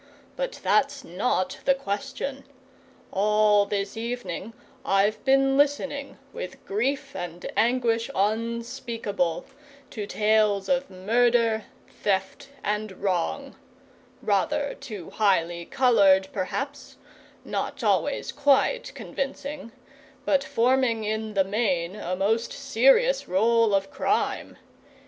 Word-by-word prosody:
But - - -4
that's 280 0 +2
not 185 0 -1
the 275 - +4
question. 270 +4 -4 0.7
All 210 0 +3
this 200 -1 -2
evening 225 -3 -5 0.3
I've 195 +2 +1
been 270 0 +4
listening, 285 -1 0 0.2
with 180 - -7
grief 275 +7 -2
and 175 0 -6
anguish 230 0 +1
unspeakable, 230 -3 -1 0.5
to 210 -3 -5
tales 210 -2 +2
of 270 0 +1
murder, 225 +3 +2 0.2
theft, 190 +6 -2
and 210 0 -2
wrong; 195 +9 -2 0.7
rather 280 +8 +1
too 205 -8 -9
highly 175 -5 +1
coloured, 195 -7 +4
perhaps, 275 +9 -4 0.5
not - - -3
always - - +1
quite 290 - +2
convincing, 275 -2 -5 0.5
but 280 -1 +2
forming 240 -2 +2
in 215 0 -3
the 195 - +4
main 190 -4 0
a 185 -3 -3
most 220 +5 0
serious 280 - +3
roll 225 +2 +3
of 195 0 -1
crime. - - -1
220 Hz, 105 wpm, -26 LUFS, 195-270 Hz, 0.7 s, the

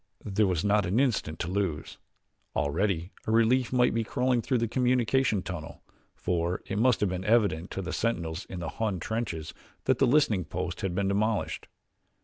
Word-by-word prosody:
There 105 0 +2
was 90 -2 0
not 105 -2 +3
an 100 +7 +1
instant 110 - 0
to - - -2
lose. 90 -5 -2 0.6
Already 85 +6 0 0.2
a - - +1
relief 115 +3 +3
might 125 -1 +3
be 115 0 +1
crawling 125 +1 +1
through 125 +3 0
the 115 0 0
communication 125 -3 +2
tunnel, 85 -4 -7 0.3
for 85 0 -1
it 100 - -2
must 125 0 +3
have 105 - +2
been 90 0 -3
evident 100 -6 +2
to 95 - -4
the 90 - -4
sentinels 90 -6 -2
in 90 -2 -7
the 85 - -3
Hun 105 -5 -2
trenches 95 -6 -3 0.3
that 130 - +2
the 135 - +4
listening 120 -8 +3
post 90 +2 -4
had 95 -4 -2
been 100 0 +1
demolished. 105 +2 0
100 Hz, 180 wpm, -28 LUFS, 90-115 Hz, 0.6 s, the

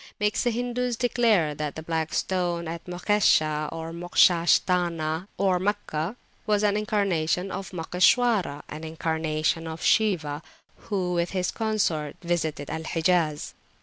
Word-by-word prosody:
makes 210 0 +1
the 245 - +2
Hindus 245 +1 -1
declare 225 -10 +2
that 150 0 -4
the 160 - -6
Black 160 -1 -2
Stone 175 -2 -1
at 165 +1 -6
Mokshesha, 175 -5 +2
or 165 0 -6
Moksha 175 0 +3
sthana 170 -1 +1 0.3
(Meccah) 195 -2 -2 0.3
was 210 -1 +2
an 205 -1 +3
incarnation 195 -4 0
of 195 - -5
Moksheshwara, 180 - +2
an 155 +1 -8
incarnation 160 0 -1
of 160 0 -6
Shiwa, 160 -9 +2 0.5
who 185 -4 -1
with 170 0 0
his 180 -1 0
consort 190 -10 -1
visited 160 -4 -2
Al 160 - -3
Hijaz. 160 -2 0
175 Hz, 130 wpm, -26 LUFS, 160-205 Hz, 0.5 s, Moksha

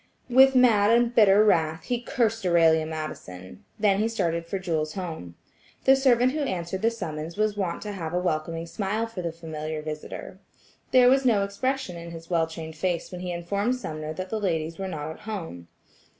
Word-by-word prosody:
With 265 +2 +7
mad 225 -5 +5
and 235 +1 +3
bitter 210 -2 +6
wrath, 160 -5 +2
he 245 -2 -2
cursed 225 -3 0
Aurelia 165 -2 +4
Madison; 155 - -7 0.2
then 200 -2 +3
he 215 - +2
started 170 -7 -1
for 195 - -2
Jewel's 160 -5 -2
home. 160 - -6 0.5
The 270 - +6
servant 255 -2 +3
who 305 - -3
answered 185 -7 -3
the 230 - +3
summons 165 -6 -6
was 215 -1 +1
wont 185 -4 -3
to 210 - -5
have 170 -5 -5
a 180 - -1
welcoming 165 -1 -2
smile 205 +5 -2
for 225 -5 -6
the 170 -1 -3
familiar 155 -2 -6
visitor. 155 0 -7 0.5
There 255 -1 +6
was 270 +2 +5
no 220 -6 +3
expression 200 0 -2
in 170 0 -8
his 165 +1 -10
well 165 -2 +2
trained 160 -1 -8
face 175 +1 -2
when 180 -1 -7
he 180 -1 -4
informed 200 +8 -1
Sumner 155 -10 -5
that 185 +2 -6
the 220 - -1
ladies 165 -4 -2
were 190 - -3
not 155 -4 -5
at 160 - -11
home. 165 - -7
180 Hz, 195 wpm, -26 LUFS, 160-220 Hz, 0.5 s, With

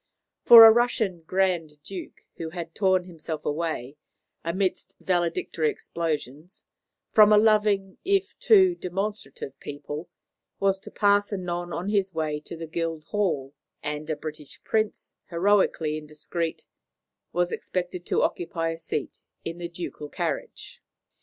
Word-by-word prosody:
For 230 -1 +11
a 225 - +11
Russian 220 -6 +1
Grand 175 -5 0
Duke, 190 -2 -8 0.2
who 165 - -4
had 165 -1 -7
torn 190 -1 +2
himself 165 -3 -7
away, 150 -4 -3 0.5
amidst 185 +3 -2
valedictory 170 -3 0
explosions, 155 - -4 0.5
from 215 -1 +7
a 210 - +7
loving 210 -3 +3
if 395 +1 +1
too 380 -5 +6
demonstrative 195 - -5
people, 145 +3 -7 0.5
was 195 -1 +2
to - - -11
pass 205 0 +2
anon 175 -3 -3
on 180 +4 -3
his 195 -4 0
way 155 -2 -1
to 160 +2 -9
the 165 - -5
Guildhall; 165 -2 -2 0.3
and 150 +1 -4
a 155 - 0
British 150 -1 -8
Prince, 220 -1 -1 0.2
heroically 170 -4 +2
indiscreet, 155 +2 -4 0.7
was 175 0 0
expected 180 -1 -3
to - - +2
occupy 165 -1 -1
a 165 - -7
seat 150 -3 -4 0.2
in 165 +1 -5
the 170 -1 -4
ducal 170 -3 -7
carriage. - - -5
175 Hz, 130 wpm, -26 LUFS, 155-195 Hz, 0.7 s, For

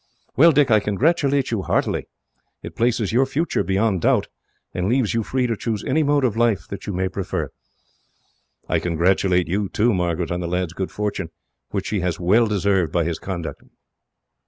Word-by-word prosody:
"Well, 165 +4 +7
Dick, 145 -4 +3
I 110 - +6
congratulate 140 - +1
you 110 -4 0
heartily. - - -1 0.6
It - - -8
places 115 -3 +1
your 130 +3 +3
future 160 +5 -1
beyond 95 -1 +1
doubt, - - +2 0.4
and 90 +2 -1
leaves 125 -3 +1
you 115 - +1
free 125 +3 -1
to 115 -2 0
choose 110 -1 -3
any 160 - +1
mode 145 -1 +2
of 115 - 0
life 115 -3 +1
that 100 -1 -7
you 100 - -2
may 95 +1 0
prefer. - - -4 1.2
"I - - +1
congratulate 90 +1 +1
you, 100 +3 -1
too, 115 +2 +2
Margaret, 90 -2 -1
on 90 - -1
the 85 - -3
lad's 90 -1 -2
good 95 +1 -3
fortune; 100 -4 -3 0.4
which - - -3
he 105 - 0
has 90 -1 -2
well 105 +7 +3
deserved 100 -5 +1
by 85 - +1
his 85 0 -3
conduct. 85 -4 -5
100 Hz, 180 wpm, -22 LUFS, 90-120 Hz, 1.2 s, Well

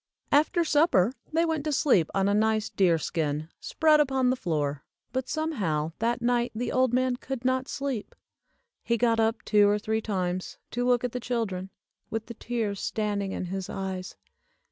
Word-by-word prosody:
After 315 +4 +3
supper 290 - +3 0.2
they 330 +2 +2
went 320 -3 -1
to 305 - 0
sleep 245 - +3
on 195 0 +2
a 200 - +2
nice 220 +1 +1
deer 180 -4 +3
skin, 155 -1 -2
spread 310 -2 +3
upon 265 -3 +2
the - - +1
floor, 150 - -2 0.3
but 260 0 -2
some 315 +1 -1
how 160 - -1
that 235 +1 0
night 240 0 +1
the 245 +3 -2
old 255 -2 +2
man 255 0 +1
could 255 -1 -6
not 260 0 +1
sleep. 270 -6 -4 0.7
He 235 - 0
got 230 0 +2
up 225 0 +1
two 205 -1 +5
or 205 - +3
three 220 +1 -1
times 185 -4 -2
to 245 +1 -1
look 245 -1 +3
at 250 - -1
the 250 - -3
children, 220 -6 -2 0.4
with 225 0 -3
the 235 - -8
tears 220 -3 -3
standing 205 -2 -2
in - - -3
his 190 +1 -4
eyes. 190 -1 -5
225 Hz, 185 wpm, -27 LUFS, 190-255 Hz, 0.7 s, two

